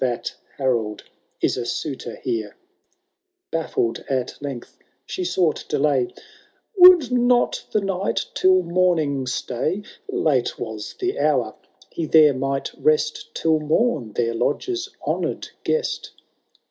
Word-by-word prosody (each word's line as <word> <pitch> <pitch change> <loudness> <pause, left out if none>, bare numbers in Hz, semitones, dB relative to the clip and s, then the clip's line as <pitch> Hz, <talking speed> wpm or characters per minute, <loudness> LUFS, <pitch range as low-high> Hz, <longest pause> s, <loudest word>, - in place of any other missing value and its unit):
That 120 -2 -2 0.2
Harold 115 -6 -1 0.4
is - - +1
a 120 - -3
suitor 130 -5 -4
here! 110 -4 -2 0.5
— - - -57
Bafiled 155 -8 -1
at 130 -2 -1
length 135 -4 -7 0.3
she 185 - -4
sought 175 -2 +1
delay: 140 -4 +2
^ - - -16 0.6
Would 360 - +8
not 245 0 +2
the 215 - +2
Knight 195 0 -1
tUl 185 0 +4
morning 170 -6 +1
stay? 140 - -2 0.3
Late 135 -6 +1
was 110 -2 -6
the 370 0 -1
hour 130 -8 +1 0.2
— - - -26
^he 160 -3 -3
there 155 -3 +7
might 135 +1 -2
rest 155 0 0
Till 160 -1 +2
mom, 150 - 0
their 115 0 0
lodge's 355 - -1 0.2
honour'd - - -2
guest." 470 +1 -1
150 Hz, 130 wpm, -22 LUFS, 125-185 Hz, 0.6 s, Would